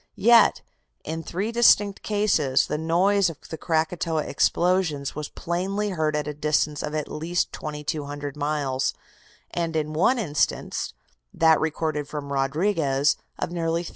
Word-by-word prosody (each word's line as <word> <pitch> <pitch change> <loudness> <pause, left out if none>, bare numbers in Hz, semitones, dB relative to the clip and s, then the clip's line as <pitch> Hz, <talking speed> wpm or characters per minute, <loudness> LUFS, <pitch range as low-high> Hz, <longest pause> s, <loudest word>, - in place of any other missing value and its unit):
Yet, 235 +1 +6 0.4
in 160 +1 -4
three 195 +7 -3
distinct 210 -4 +4
cases, 205 -11 +2
the 150 - -3
noise 180 +4 +3
of 165 - -8
the - - -2
Krakatoa 160 0 0
explosions 170 -6 +1
was 150 -1 -5
plainly 195 +5 -2
heard 155 -4 0
at 150 -1 -2
a 150 - -3
distance 150 0 0
of 150 +1 -4
at 155 - -2
least 165 +3 -2
2,200 145 -1 -5
miles, 145 -3 -1 0.6
and 165 -2 -2
in 155 -1 -1
one 185 +11 +3
instance 155 - -1 0.4
that 160 -1 +5
recorded 155 -2 -1
from 145 -2 -5
Rodriguez 140 0 +1 0.2
of - - -3
nearly 165 0 -1
3,000. - - -7
160 Hz, 140 wpm, -25 LUFS, 150-175 Hz, 0.6 s, Yet